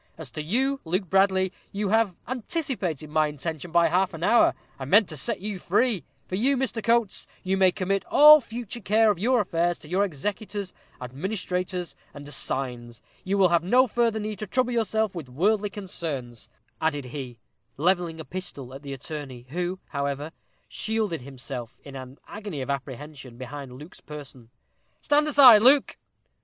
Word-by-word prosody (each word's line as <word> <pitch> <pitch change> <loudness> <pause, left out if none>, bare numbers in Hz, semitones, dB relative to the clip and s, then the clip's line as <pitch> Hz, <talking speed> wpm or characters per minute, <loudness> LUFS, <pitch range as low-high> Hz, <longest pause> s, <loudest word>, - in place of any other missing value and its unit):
As 155 -6 -6
to 150 - -4
you, 265 - 0
Luke 180 +2 -2
Bradley, 190 -1 +3 0.2
you 200 0 -2
have 220 -3 +2
anticipated 245 - -3
my 155 0 +3
intention 160 +3 -5
by 170 0 +4
half 180 +2 +1
an 165 - -7
hour; 235 +6 +4 0.2
I 135 - -4
meant 205 +8 +5
to 155 - -7
set 145 - -3
you 205 -2 -4
free. 205 - +1 0.2
For - - -12
you, 260 +8 +2
Mr. 245 -4 -2
Coates, 235 -3 +1 0.2
you 190 +1 0
may 190 -1 +5
commit 195 0 -1
all 300 +1 +8
future 235 0 -7
care 215 +2 +4
of 190 - -4
your 245 +3 +3
affairs 175 -2 0
to - - -14
your 185 +5 +1
executors, 200 +3 -4 0.3
administrators, 180 - -3 0.2
and 145 0 -9
assigns. 125 -4 -4 0.2
You 195 +1 0
will 190 -2 +5
have 170 -1 +2
no 250 +8 +5
further 230 -2 +1
need 210 -2 -4
to 215 - -5
trouble 250 +4 +1
yourself 220 -2 0
with 160 -7 -7
worldly 205 +10 +1
concerns," 160 - -6 0.3
added 145 -4 0
he, 125 -2 -7 0.4
levelling 170 +1 +1
a 160 - -6
pistol 140 -9 -6
at 135 - -9
the 140 -1 -6
attorney, 135 -3 -7
who, 180 +4 -2
however, 140 +1 -3 0.4
shielded 215 -8 -2
himself, 125 -2 -7
in 140 -1 -10
an 130 +1 -9
agony 205 -8 -6
of 140 - -3
apprehension, 140 -2 -7
behind 130 +1 -8
Luke's 150 +6 -12
person. 135 -6 -11 0.5
"Stand 295 0 +2
aside, 260 -7 +8
Luke." 270 +4 +5
180 Hz, 170 wpm, -26 LUFS, 145-215 Hz, 0.5 s, all